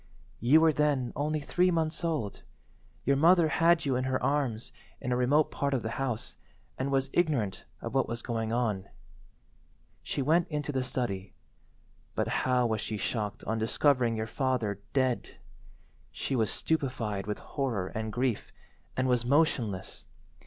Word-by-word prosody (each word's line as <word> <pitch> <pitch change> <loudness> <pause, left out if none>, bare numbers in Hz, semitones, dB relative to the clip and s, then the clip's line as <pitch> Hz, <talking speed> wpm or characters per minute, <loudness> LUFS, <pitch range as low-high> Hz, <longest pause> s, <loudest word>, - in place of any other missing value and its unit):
"You 140 +8 +5
were 160 -1 +5
then 145 -4 +1
only 150 +2 0
three 180 +5 +2
months 165 -1 0
old. 155 -12 -2 0.6
Your 140 - +4
mother 165 +3 +5
had 165 +1 +3
you 135 -2 +1
in 130 +1 0
her 130 -1 0
arms 135 -6 0 0.3
in 125 - -3
a - - +3
remote 140 +5 +3
part 140 -1 0
of 125 - -2
the 110 - -3
house, 125 -5 -3 0.4
and 135 +1 -2
was 135 0 +1
ignorant 140 - 0 0.2
of 115 - -5
what 135 - +2
was 120 0 -4
going 115 -2 -2
on. 110 -5 -1 1.1
She 140 - -2
went 165 +5 +3
into 150 -2 -3
the 130 -2 0
study, 100 -7 -3 0.8
but - - 0 0.2
how 125 -1 +3
was 110 -2 0
she 110 - -3
shocked 105 -1 -3
on 110 +1 -1
discovering 120 +1 +2
your 110 - -1
father 115 -5 -1
dead. 130 -3 0 0.8
She 135 - -2
was 110 -4 +2
stupefied 115 -10 -1
with 105 - -2
horror 120 -10 -2
and 110 0 -4
grief, 125 -1 -1 0.5
and 130 0 +2
was 125 -2 +2
motionless. 120 - 0
130 Hz, 160 wpm, -30 LUFS, 115-145 Hz, 1.1 s, You